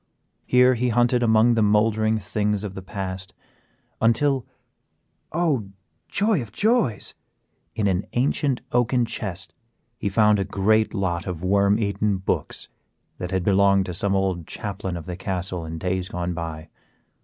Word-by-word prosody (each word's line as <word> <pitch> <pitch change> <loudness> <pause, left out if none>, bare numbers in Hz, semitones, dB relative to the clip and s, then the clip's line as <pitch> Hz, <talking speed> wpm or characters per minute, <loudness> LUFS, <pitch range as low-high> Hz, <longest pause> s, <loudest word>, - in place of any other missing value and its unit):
Here 125 0 +5
he 125 +1 0
hunted 120 +1 +2
among 115 0 +4
the 115 - +2
mouldering 110 +1 +3
things 105 0 -1
of 100 -3 -5
the 95 - -7
past 95 0 -6 0.7
until, 130 +3 +2 0.8
oh, 150 - 0 0.4
joy 205 -5 +2
of 110 -4 -8
joys! 205 - +1 0.6
in 110 - 0
an 95 -1 0
ancient 135 +1 +1
oaken 120 0 +2
chest 95 -5 -6 0.5
he 100 - -1
found 105 +1 +4
a - - +1
great 110 +4 +1
lot 90 -3 -1
of 90 -2 -5
worm 100 +2 +3
eaten 100 -2 0
books, 95 - -2 0.5
that 90 - -4
had 95 -1 -1
belonged 100 0 +4
to 90 - -5
some 100 +3 0
old 95 -4 -1
chaplain 95 -3 -4
of 80 - -8
the 90 -1 -5
castle 90 -2 -3
in 80 +1 -5
days 90 +2 -2
gone 90 0 -3
by. 80 -2 -6
100 Hz, 150 wpm, -24 LUFS, 95-115 Hz, 0.8 s, Here